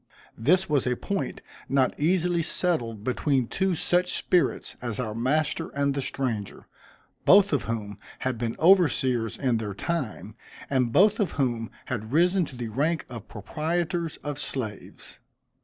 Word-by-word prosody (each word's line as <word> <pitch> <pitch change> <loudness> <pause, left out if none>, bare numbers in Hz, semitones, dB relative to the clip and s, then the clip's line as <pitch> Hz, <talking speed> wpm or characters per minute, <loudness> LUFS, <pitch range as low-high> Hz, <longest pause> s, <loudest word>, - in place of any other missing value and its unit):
This 180 +11 +2
was 145 -4 +1
a 125 - +1
point 200 +9 -3 0.3
not 135 -1 +2
easily 175 +2 +2
settled 125 - -1
between 130 +1 +1
two 190 +8 0
such 180 +3 +1
spirits 175 -7 +1
as 120 -2 -4
our 110 -4 -2
master 150 +7 0
and 140 0 +1
the 140 - -2
stranger; 120 -7 -3 0.6
both 200 -2 +6
of 140 - +1
whom 105 -3 -4 0.2
had 130 -3 -2
been 115 -1 -2
overseers 135 - +3
in 125 -4 +1
their 105 -3 -4
time, 125 -6 -3 0.4
and 125 -3 +2
both 210 - +4
of 200 -6 0
whom 120 -5 -1 0.2
had 110 -3 -4
risen 175 +4 +3
to 140 - -11
the 120 -2 -5
rank 150 +8 0
of 115 -4 -8
proprietors 165 - -2
of 145 -1 -3
slaves. 110 -8 -5
140 Hz, 150 wpm, -26 LUFS, 115-170 Hz, 0.6 s, both